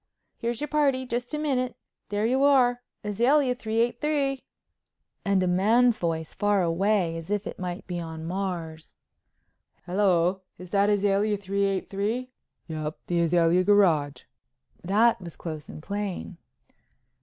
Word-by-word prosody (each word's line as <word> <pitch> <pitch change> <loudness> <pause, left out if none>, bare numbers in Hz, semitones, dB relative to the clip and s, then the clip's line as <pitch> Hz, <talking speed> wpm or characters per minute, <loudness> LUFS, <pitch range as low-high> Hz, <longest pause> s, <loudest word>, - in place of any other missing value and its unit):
"Here's 235 0 -2
your 295 - -1
party. 275 -3 +1
Just 245 0 -3
a - - -2
minute. 260 -5 -1 0.3
There 205 +1 0
you 260 +4 +2
are—Azalea 250 0 +2
383." 250 +5 0 0.8
Then 200 -1 +2
a - - +2
man's 220 +6 +3
voice 160 -2 -2
far 205 -2 +2
away 175 0 +1
as 165 +1 -8
if 205 -1 -1
it - - -7
might 180 -1 -5
be 175 -1 -4
in 160 -1 -6
Mars: 170 -3 -4 0.9
"Hello, 185 -1 +2 0.2
is 180 -1 -11
that 200 0 +3
Azalea 205 +1 +2
383?" 200 +4 -2 0.4
"Yep—the 155 +2 -3
Azalea 170 +1 +3
Garage," 175 -8 +3 0.6
that 210 +4 +3
was 170 -2 -9
close 155 -3 -7
and 155 - -9
plain. 200 -2 -4
200 Hz, 125 wpm, -26 LUFS, 175-240 Hz, 0.9 s, man's